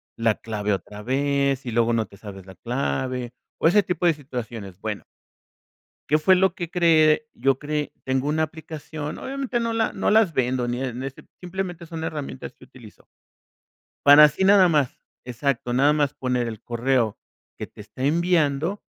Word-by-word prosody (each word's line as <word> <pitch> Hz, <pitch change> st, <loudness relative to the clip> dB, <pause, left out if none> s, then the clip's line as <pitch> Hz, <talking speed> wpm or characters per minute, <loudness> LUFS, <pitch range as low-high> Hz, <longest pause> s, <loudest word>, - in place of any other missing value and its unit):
la 115 Hz, -2 st, +1 dB
clave 105 Hz, -2 st, -2 dB
otra 105 Hz, +2 st, -6 dB
vez, 140 Hz, +1 st, 0 dB
y 120 Hz, -, -3 dB
luego 115 Hz, +1 st, +2 dB
no 115 Hz, -1 st, +1 dB
te 100 Hz, 0 st, -17 dB
sabes 95 Hz, -2 st, -10 dB
la 95 Hz, -, -12 dB
clave, 125 Hz, +2 st, -3 dB, 0.3 s
o, -, -, +4 dB
ese 205 Hz, +5 st, +5 dB
tipo 180 Hz, -1 st, -2 dB
de 170 Hz, -, +5 dB
situaciones. 120 Hz, -, -7 dB
Bueno 105 Hz, -1 st, -4 dB, 1.1 s
¿qué 155 Hz, -, +4 dB
fue 185 Hz, +4 st, +4 dB
lo 190 Hz, -1 st, +2 dB
que 170 Hz, -2 st, -5 dB
creé? 165 Hz, +2 st, +4 dB
Yo 135 Hz, -1 st, +1 dB
creé 150 Hz, 0 st, -3 dB
Tengo 130 Hz, +1 st, 0 dB
una 155 Hz, +1 st, +1 dB
aplicación, 155 Hz, -1 st, -7 dB
obviamente 270 Hz, -2 st, -3 dB
no 230 Hz, -1 st, -1 dB
la 225 Hz, -1 st, 0 dB
no -, -, 0 dB
las 215 Hz, -5 st, +4 dB
vendo 125 Hz, -2 st, 0 dB
ni 120 Hz, +1 st, -2 dB
en 125 Hz, -1 st, -4 dB
ese 135 Hz, 0 st, -7 dB, 0.2 s
simplemente 180 Hz, -1 st, -5 dB
son 160 Hz, 0 st, -6 dB
herramientas 145 Hz, -, -6 dB
que -, -, -17 dB
utilizo. -, -, -16 dB, 1.0 s
Para 145 Hz, +1 st, +10 dB
así 150 Hz, +5 st, +4 dB
nada 195 Hz, -2 st, +6 dB
más. 150 Hz, -6 st, +1 dB, 0.3 s
Exacto, 125 Hz, 0 st, -2 dB
nada 140 Hz, +4 st, +4 dB
más 145 Hz, -2 st, 0 dB
poner 125 Hz, -2 st, -1 dB
el 110 Hz, -1 st, -7 dB
correo 120 Hz, -2 st, 0 dB, 0.4 s
que -, -, -5 dB
te -, -, -16 dB
está 110 Hz, +5 st, -7 dB
enviando, 165 Hz, +2 st, +1 dB
140 Hz, 175 wpm, -24 LUFS, 120-165 Hz, 1.1 s, Para